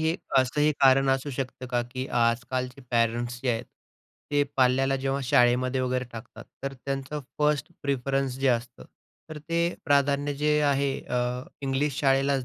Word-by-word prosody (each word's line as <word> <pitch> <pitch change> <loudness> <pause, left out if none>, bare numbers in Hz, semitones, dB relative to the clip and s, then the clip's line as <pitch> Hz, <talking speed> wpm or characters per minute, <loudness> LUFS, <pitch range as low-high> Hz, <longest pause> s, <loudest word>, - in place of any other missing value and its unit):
हे 160 +1 +1 0.2
असंही 145 +4 +2
कारण 135 0 +5
असू 135 +2 0
शकतं 130 -1 -5
का, 120 -1 0
की 130 +2 -5
आजकालचे 125 +2 0
पॅरंट्स 120 +1 0
जे 130 - +1
आहेत, 115 -1 -2 0.7
ते 145 0 +3
पाल्याला 135 +1 +3
जेव्हा 135 +1 -1
शाळेमध्ये 125 +1 +3
वगैरे 125 0 -1
टाकतात, 115 +2 -10 0.2
तर 135 0 -3
त्यांचं 135 +2 -3 0.2
फर्स्ट 150 -3 +1
प्रिफरन्स 135 -1 -1
जे 135 - +2
असतं, 120 0 -1 0.5
तर 155 - -6
ते 170 +3 -1
प्राधान्य 145 -1 +2
जे 150 +1 +2
आहे, 140 -1 +2
अ, 125 0 -1 0.2
इंग्लिश 135 +1 -1
शाळेलाच 135 -1 +2
135 Hz, 150 wpm, -27 LUFS, 125-140 Hz, 0.7 s, कारण